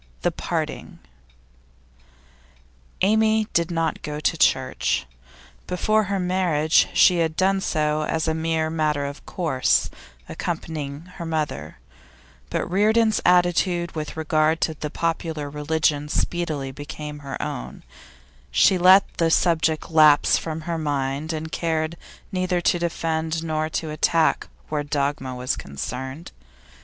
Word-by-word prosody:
THE - - +2
PARTING - - -4 2.0
Amy 220 +2 +3
did 170 0 +2
not 165 -2 -1
go 150 0 -5
to 150 - +1
church. - - +1 0.6
Before 215 +4 +1
her 195 0 -1
marriage 180 -4 +2
she 180 - +5
had 160 -1 0
done 195 +2 +2
so 155 -3 0
as 160 +1 -1
a 160 - +1
mere 160 0 -1
matter 150 -3 0
of 140 +1 -7
course, 155 -8 +1 0.4
accompanying 145 -3 -4 0.2
her 170 - -5
mother, 150 - -3 0.7
but - - -1
Reardon's 215 +4 +2
attitude 175 -1 +3
with 155 0 -6
regard 155 0 +1
to 160 - +1
the 150 0 -5
popular 160 -2 -3
religion 150 0 0
speedily 155 -6 -2
became 150 +1 -7
her 140 -1 -6
own; - - -5 0.7
she 180 - +4
let 185 +2 +7
the 165 -1 +2
subject 160 -1 +1
lapse 155 -2 +6
from 160 -1 -3
her 165 0 -3
mind, 145 0 -2
and 160 0 -5
cared 160 0 -1 0.4
neither 185 -1 0
to 175 0 +1
defend 165 -1 -2
nor 155 -1 -1
to 160 0 -3
attack 160 +1 +2 0.2
where 150 -1 -1
dogma 140 -3 -2
was 125 +1 -2
concerned. 130 - -6
160 Hz, 125 wpm, -23 LUFS, 150-175 Hz, 2.0 s, let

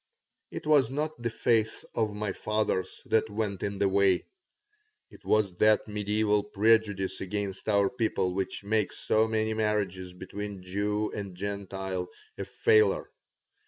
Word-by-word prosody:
It - - -7
was 145 -5 +4
not 150 0 -3
the 120 - 0
faith 115 -1 +1
of 110 -2 -1
my 105 -1 -2
fathers 105 -3 -1
that 110 0 +2
was 105 -2 -2
in 100 0 -2
the 100 - +2
way. 95 -1 +3 0.9
It - - -16
was 105 -4 +2
that 110 0 +4
medieval 105 0 +1
prejudice 105 -2 +2
against 100 +1 -3
our 100 -1 +4
people 110 -5 -1
which 95 +1 -3
makes 105 -1 0
so 110 +1 +2
many 110 0 0
marriages 100 -4 -1
between 100 +1 -7
Jew 105 +3 -1
and 100 -3 -6
Gentile 95 -2 -4 0.3
a - - -5
failure. 440 -1 +3
105 Hz, 140 wpm, -29 LUFS, 95-110 Hz, 0.9 s, was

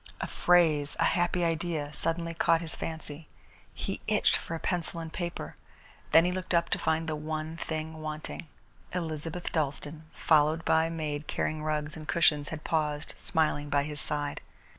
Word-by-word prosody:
A - - -1
phrase, 160 -5 +3
a - - +4
happy 175 0 +2
idea, 160 -3 -1
suddenly 165 +1 0
caught 165 0 +3
his 165 -1 -4
fancy. 160 -1 -6 0.4
He - - -4
itched - - +4
for 165 - -3
a - - -4
pencil 175 -1 -1
and 165 -1 -6
paper. 175 -1 -4 0.6
Then 165 +1 +7
he 180 - +2
looked 185 -1 -1
up 170 0 +3
to - - +1
find 160 0 +1
the 155 - -1
one 155 +1 -3
thing 160 -1 -4
wanting. 155 +2 -5 0.5
Elizabeth 165 0 -3
Dalstan, 150 0 -2 0.2
followed 155 +1 +4
by 160 0 +4
a - - -1
maid 155 -2 -3
carrying 155 0 -1
rugs 150 -1 -1
and 155 -1 -9
cushions, 150 -4 +3
had 160 -1 -6
paused, 150 -2 0
smiling, 155 -3 +1
by 140 0 +3
his 150 -1 -4
side. 145 +2 -1
160 Hz, 170 wpm, -30 LUFS, 150-165 Hz, 0.6 s, Then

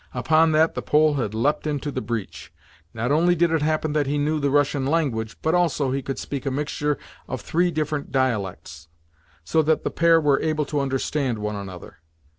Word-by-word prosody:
Upon 160 0 +3
that 160 +1 +3
the - - -4
Pole 150 0 +3
had 115 -7 -2
leapt 145 +7 0
into 145 -1 -2
the 130 - -3
breach. 115 -5 -5 0.4
Not 120 +3 -2
only 170 +4 +3
did 170 0 +2
it 160 -2 +1
happen 155 0 0
that 150 -2 +1
he 145 +1 0
knew 150 +2 0
the 140 -1 +1
Russian 145 0 +2
language, 130 -8 -1
but 160 - +1
also 165 -6 +1
he 135 +1 -1
could 135 0 -5
speak 140 -2 -5
a - - +3
mixture 145 +1 -1 0.3
of - - -5
three 175 +2 +1
different 155 -3 -3
dialects, 105 - -2 0.6
so 160 - +2
that 155 0 +1
the - - -2
pair 165 0 +4
were 145 -3 +2
able 155 -1 0
to 145 +1 -2
understand 135 -2 -1
one 105 0 -3
another. 95 -3 -9
145 Hz, 200 wpm, -23 LUFS, 130-155 Hz, 0.6 s, pair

